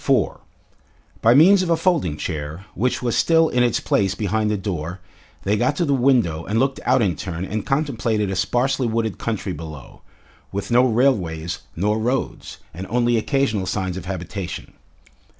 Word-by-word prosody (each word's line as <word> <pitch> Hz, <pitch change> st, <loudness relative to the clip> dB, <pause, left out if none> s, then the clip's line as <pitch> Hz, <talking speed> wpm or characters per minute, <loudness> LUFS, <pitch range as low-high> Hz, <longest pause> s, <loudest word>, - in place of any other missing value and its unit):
4 -, -, +1 dB, 0.8 s
By 115 Hz, +2 st, +5 dB
means 185 Hz, +7 st, +7 dB
of 180 Hz, -, -2 dB
a 165 Hz, -, +3 dB
folding 160 Hz, -, +1 dB
chair, 75 Hz, +5 st, -5 dB
which 125 Hz, +2 st, -1 dB
was 120 Hz, -2 st, 0 dB
still 165 Hz, -1 st, +4 dB
in 125 Hz, -, +1 dB
its 120 Hz, -2 st, +2 dB
place 100 Hz, -1 st, +1 dB
behind 110 Hz, 0 st, 0 dB
the 105 Hz, -, 0 dB
door, 90 Hz, -2 st, -4 dB, 0.4 s
they 100 Hz, +2 st, +1 dB
got 125 Hz, +7 st, +1 dB
to 170 Hz, -, 0 dB
the 140 Hz, -, +1 dB
window 120 Hz, -12 st, +2 dB
and 105 Hz, +5 st, -2 dB
looked 135 Hz, +3 st, +1 dB
out 130 Hz, -1 st, +4 dB
in 95 Hz, -4 st, +1 dB
turn 90 Hz, -1 st, -5 dB
and 105 Hz, +2 st, -4 dB
contemplated 115 Hz, -8 st, 0 dB
a -, -, -2 dB
sparsely 125 Hz, +7 st, +1 dB
wooded 110 Hz, -2 st, -1 dB
country 105 Hz, -4 st, -3 dB
below, 75 Hz, -4 st, -9 dB, 0.5 s
with 100 Hz, +4 st, -4 dB
no 125 Hz, +2 st, +5 dB
railways 90 Hz, -10 st, +1 dB, 0.2 s
nor 105 Hz, +5 st, 0 dB
roads, 125 Hz, +4 st, -2 dB, 0.2 s
and 95 Hz, +3 st, -7 dB
only 120 Hz, 0 st, +2 dB
occasional 110 Hz, -5 st, 0 dB
signs 95 Hz, -3 st, -2 dB
of 95 Hz, -2 st, -6 dB
habitation. 95 Hz, 0 st, -5 dB
110 Hz, 170 wpm, -22 LUFS, 95-125 Hz, 0.8 s, means